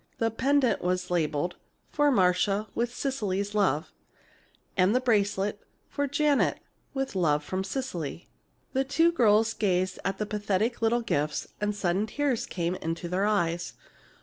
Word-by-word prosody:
The 225 0 +1
pendant 265 +2 +2
was 180 0 -1
labeled, 165 0 0 0.3
"For 295 0 +3
Marcia, 195 -2 +2
with 240 0 -1
Cecily's 210 -7 -2
love," 190 -7 +1 0.8
and 190 +4 +3
the - - +5
bracelet, 205 -4 +1 0.3
"For 285 0 -1
Janet, 290 +1 +2 0.4
with 270 0 -2
love 150 -5 +2
from 185 +5 -2
Cecily." 190 - -4 0.5
The 265 0 +2
two 325 +5 +3
girls 225 -6 +4
gazed 185 -3 0
at 195 0 -1
the 210 - -2
pathetic 210 +2 -1
little 230 +1 +2
gifts 150 -9 -1
and 210 0 0
sudden 195 +2 0
tears 280 -2 -1
came 170 -1 -2
into 165 -1 -4
their 190 +3 +1
eyes. 175 -5 0
205 Hz, 145 wpm, -28 LUFS, 180-240 Hz, 0.8 s, the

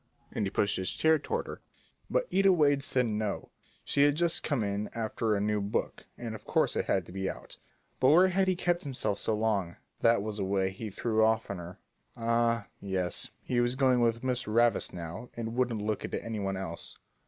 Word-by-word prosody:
and 105 - -1
he - - -1
pushed 100 +1 +1
his 95 0 -1
chair 160 0 +3
toward - - -2
her. - - -8 0.5
But - - +1
Ida 195 0 +5
Wade 145 -5 +3
said 125 -2 +2
no, 105 -2 -2 0.3
she 140 - +1
had 145 0 +5
just 170 +1 +2
come 140 -7 0
in 100 +1 -2
after 110 -1 0
a - - 0
new 105 0 0
book, 100 +1 -3
and 115 -2 -5
of 105 -1 -8
course - - +1
it - - 0
had 95 -3 +1
to - - -12
be 95 0 -2
out. - - -9 0.4
But 130 - +5
where 180 +5 +6
had 190 +1 +2
he 185 - +2
kept 175 0 0
himself 130 -7 -2
so 110 - 0
long? 105 -5 0 0.2
That 115 -3 +4
was 110 -1 -4
the 100 - -1
way 95 0 +1
he 105 +3 -6
threw 110 +2 +1
off 110 -1 +2
on 100 - -5
her; 85 +1 -9 0.4
ah, 115 -1 +1
yes, 95 -3 -2
he 125 - 0
was 120 +1 +1
going 130 -2 +3
with 115 0 +1
Miss 125 -2 -1
Ravis 115 +2 +2
now 90 +7 -7
and 115 -1 -3
wouldn't 120 -4 0
look 110 -1 -1
at - - -3
any 115 -2 -4
one 95 -1 -2
else. 85 -3 -6
110 Hz, 215 wpm, -30 LUFS, 100-130 Hz, 0.5 s, where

